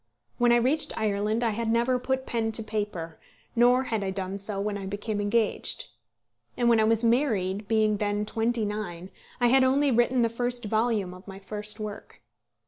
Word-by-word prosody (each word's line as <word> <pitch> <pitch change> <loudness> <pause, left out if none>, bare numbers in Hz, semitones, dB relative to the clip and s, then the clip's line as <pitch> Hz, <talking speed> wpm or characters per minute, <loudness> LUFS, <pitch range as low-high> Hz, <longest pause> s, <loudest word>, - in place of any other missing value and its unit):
When 240 0 +4
I - - +6
reached 255 +6 +1
Ireland 215 +1 0
I 230 - +2
had 225 +1 -2
never 240 +2 +2
put 260 +1 -2
pen 225 -1 -1
to 225 - -1
paper; 205 -7 -4 0.4
nor 245 +2 +5
had 220 -5 -2
I 195 - -1
done 190 0 -4
so 200 0 -4
when 205 +1 -2
I 195 -1 -5
became 205 +1 -3
engaged. 220 - -1 0.7
And 240 -1 +2
when 230 -1 +5
I 220 - +4
was 225 +1 +3
married, 215 -6 +1
being 215 -1 +2
then 205 0 -1
twenty 225 +1 0
nine, 195 -4 -5 0.3
I 245 -1 +4
had 265 +1 +5
only 275 +2 +3
written 240 +1 +3
the - - +4
first 245 +1 -3
volume 215 -3 0
of 185 +2 -14
my 195 -1 -8
first 210 +2 -6
work. 210 -1 -7
220 Hz, 190 wpm, -27 LUFS, 205-240 Hz, 0.7 s, I